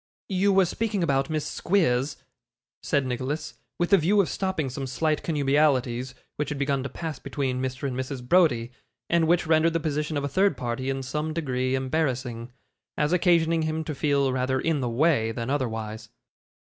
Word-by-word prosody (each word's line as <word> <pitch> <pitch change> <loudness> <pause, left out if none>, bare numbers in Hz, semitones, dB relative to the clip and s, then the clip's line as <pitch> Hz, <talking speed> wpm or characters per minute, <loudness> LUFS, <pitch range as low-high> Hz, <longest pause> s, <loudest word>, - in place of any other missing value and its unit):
'You 195 +1 +2
were 190 -1 +5
speaking 205 +1 -1
about 135 -4 +1
Miss 155 -2 -1
Squeers,' 140 -7 +1 0.6
said 140 -2 0
Nicholas, 130 +4 -3 0.2
with 175 +2 -1
the 200 - +7
view 195 +6 +3
of 195 - +3
stopping 190 -7 -1
some 135 +1 -4
slight 155 +3 0
connubialities 135 -4 +1 0.2
which 150 -1 -2
had 150 - -3
begun 140 -1 0
to 140 - -4
pass 160 -2 -5
between 130 -3 -2
Mr 130 +1 -3
and 130 - -3
Mrs. 130 -1 -5
Browdie, 125 -10 +3 0.4
and 170 -2 +3
which 175 +1 +3
rendered 160 +1 +3
the 165 - +1
position 150 -1 -2
of 145 - -2
a - - 0
third 190 +8 +2
party 125 +1 -3
in 135 0 -2
some 150 +4 -3
degree 130 -5 -1
embarrassing, 130 -4 -2 0.5
as 150 +3 +1
occasioning 170 -2 +3
him 155 0 -1
to 155 - -4
feel 140 -2 +1
rather 130 +1 0
in 160 0 0
the 125 - -1
way 120 -2 +2
than 115 +2 -4
otherwise. 110 -5 -3
145 Hz, 180 wpm, -26 LUFS, 130-160 Hz, 0.6 s, the